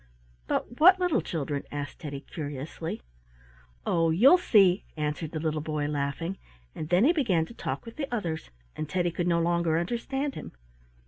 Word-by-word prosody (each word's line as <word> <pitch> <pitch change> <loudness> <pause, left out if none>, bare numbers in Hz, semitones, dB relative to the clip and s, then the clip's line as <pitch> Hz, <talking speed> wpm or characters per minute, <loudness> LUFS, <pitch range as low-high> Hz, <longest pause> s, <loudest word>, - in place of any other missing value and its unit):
"But 240 - -2
what 370 +4 +8
little 355 -9 +2
children?" 145 -3 -3
asked 145 -2 -5
Teddy, 145 -4 -6
curiously. 145 - -6 0.8
"Oh, 165 -1 +2
you'll 255 - +6
see!" 195 - +4
answered 150 +1 -2
the 155 - -4
little 155 -1 -1
boy, 150 -1 -2
laughing, 145 +5 -2 0.3
and 155 - -6
then 180 +4 +4
he 315 +7 +5
began 200 - +2
to 235 - -12
talk - - -4
with 230 - -10
the 280 -4 -4
others, 170 - -3 0.3
and 155 - -4
Teddy 175 +1 0
could 175 +1 -2
no 170 -1 +3
longer 170 -1 +2
understand 265 - -2
him. - - -8
170 Hz, 170 wpm, -28 LUFS, 155-230 Hz, 0.8 s, what